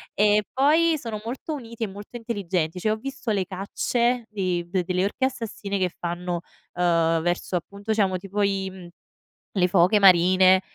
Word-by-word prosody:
e 210 0 +4
poi 315 +4 +4
sono 225 -5 -6
molto 255 +6 -5
uniti 230 -5 -6
e - - 0
molto 205 +5 -9
intelligenti, 195 -8 -2
cioè 215 - -2
io 215 - +3
ho - - -10
visto 270 -1 -4
le 195 -3 0
cacce 235 +6 -1
di 180 -4 -2
de 185 -1 0
delle 180 +1 0
orche 230 +6 -3
assassine 220 -5 -4
che 185 - +2
fanno, 175 0 -3 0.3
ehm, 165 -2 +2
verso, 175 +2 -1
appunto 200 +5 -4
diciamo 195 -4 +2
tipo 195 +2 -4
i 195 -1 0
mhmm, 185 -2 -11 0.7
le 180 -3 +3
foche 185 +3 +4
marine 185 0 +6
195 Hz, 175 wpm, -24 LUFS, 180-225 Hz, 0.7 s, marine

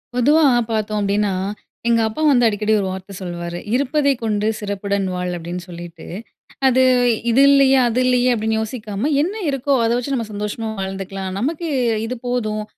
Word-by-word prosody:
பொதுவா 295 +5 +4 0.3
பார்த்தோம் 215 -1 -1
அப்டீன்னா, 200 0 +1 0.5
எங்க 230 -1 +3
அப்பா 220 +8 -5
வந்து 245 -4 +4
அடிக்கடி 215 0 0
ஒரு 195 - -1
வார்த்த 190 +1 -8
சொல்லுவாரு. 175 -1 -5 0.2
"இருப்பதை 280 +2 +2
கொண்டு 210 -1 0
சிறப்புடன் 200 -1 -2
வாழ்" 180 0 -3
அப்படின்னு 175 +1 -5
சொல்லிட்டு. 170 -1 -10 0.6
அது 260 0 +4 0.5
இது 260 +4 +4
இல்லையே, 275 -1 +5
அது 235 +1 0
இல்லையே 250 0 +3
அப்படின்னு 220 0 -1
யோசிக்காம, 220 +2 -3
என்ன 350 +6 -1 0.2
இருக்கோ 275 0 0
அத - - +1
வச்சு 250 +3 -3
நம்ம 235 -3 -2
சந்தோஷமா 210 +2 -4
வாழ்ந்துக்கலாம். 195 0 -4
"நமக்கு 315 - -2 0.4
இது 245 +3 -4
போதும்." 215 -4 -1
215 Hz, 155 wpm, -20 LUFS, 195-255 Hz, 0.6 s, இல்லையே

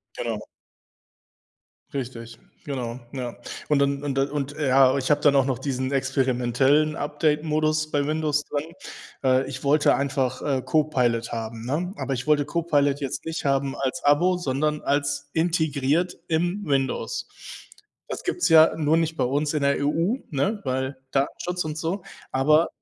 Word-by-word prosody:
Genau. - - -3 1.5
Richtig, 115 -3 -6 0.3
genau, 125 -4 -4
ja. 125 -3 -4 0.3
Und 150 -2 +3
dann 140 0 +1
und 140 -2 -1
dann 135 +1 +1
und 145 -1 -3
ja, 135 -1 +5
ich 130 +1 -2
habe 150 - +3
dann 145 -1 +4
auch 135 -1 +4
noch 130 -3 0
diesen 130 -1 -2
experimentellen 135 +2 +2
Update-Modus 155 +1 0
bei 145 -1 0
Windows 150 -1 0
drin. 145 +2 -4 0.6
Äh, 130 0 +3
ich 130 0 -7
wollte 145 +2 +4
einfach, 135 -2 -1
äh, 135 -3 0
Copilot 125 -7 +1
haben, 115 0 -5
ne? 170 +8 -1
Aber 135 - -2
ich 125 +3 -4
wollte 145 -2 +3
Copilot 145 -4 +1
jetzt 140 +2 -4
nicht 165 0 -4
haben 135 -1 0
als 135 +5 -3
Abo, 175 +6 +4
sondern 150 -1 -1
als 145 0 -1
integriert 160 0 +1
im 175 +5 0
Windows. 140 - -1 0.8
Das - - -6
gibt's 355 - 0
ja 160 0 +7
nur 160 +1 +2
nicht 165 0 -1
bei - - +1
uns 145 +4 0
in 150 - 0
der 140 0 +3
EU, 170 - +1 0.2
ne, 195 +10 0
weil 130 0 -2
Datenschutz 175 +6 -1
und 155 0 -5
so. 170 +4 -2 0.3
Aber 150 +5 +4
145 Hz, 155 wpm, -24 LUFS, 135-155 Hz, 1.5 s, ja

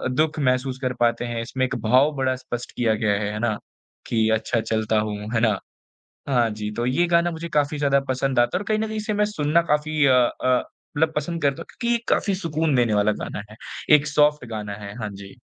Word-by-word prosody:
दुख 155 +1 +1
महसूस 130 -1 0
कर 125 -1 -1
पाते 120 0 +1
हैं। 120 -1 -3
इसमें 130 +2 -1
एक 130 +1 -3
भाव 130 +7 +4
बड़ा 130 -1 0
स्पष्ट 120 -1 -6
किया 115 -3 +2
गया 105 -1 +1
है, 105 0 -2
है 105 - -4
ना? 110 -2 0 0.5
कि 110 -1 +1
अच्छा 115 +1 0
चलता 110 -1 0
हूँ, 105 -1 -2 0.2
है 115 - +2
ना? 110 -4 +3 0.7
हाँ 120 -4 +3
जी। 105 0 -4
तो 120 +1 -1
ये 155 +8 +2
गाना 170 0 +3
मुझे 165 +1 -6
काफ़ी 150 -1 0
ज़्यादा 140 -1 +3
पसंद 130 0 0
आता 120 +8 +3
है - - -1
और - - -5
कहीं 215 0 +2
न 220 - -1
कहीं 220 - -5
इसे 215 0 -2
मैं 210 0 +2
सुनना 170 -5 +1
काफ़ी 150 0 +1
अ 130 - +5
अ, 125 0 +2 0.4
मतलब 160 +1 +2
पसंद 165 +2 -2
करता 140 -1 +1
हूँ - - -15
क्योंकि 235 -1 -2
ये - - +2
काफ़ी 200 - +2
सुकून 160 -5 -1
देने 120 -4 +2
वाला 105 +1 +3
गाना 100 - -5
है, 110 - -12 0.4
एक 145 +1 -3
सॉफ़्ट 150 -2 +2
गाना 105 -2 -4
है। 100 +1 -7
हाँ, 105 -1 -3
जी। 100 0 -11
130 Hz, 235 wpm, -23 LUFS, 110-155 Hz, 0.7 s, अ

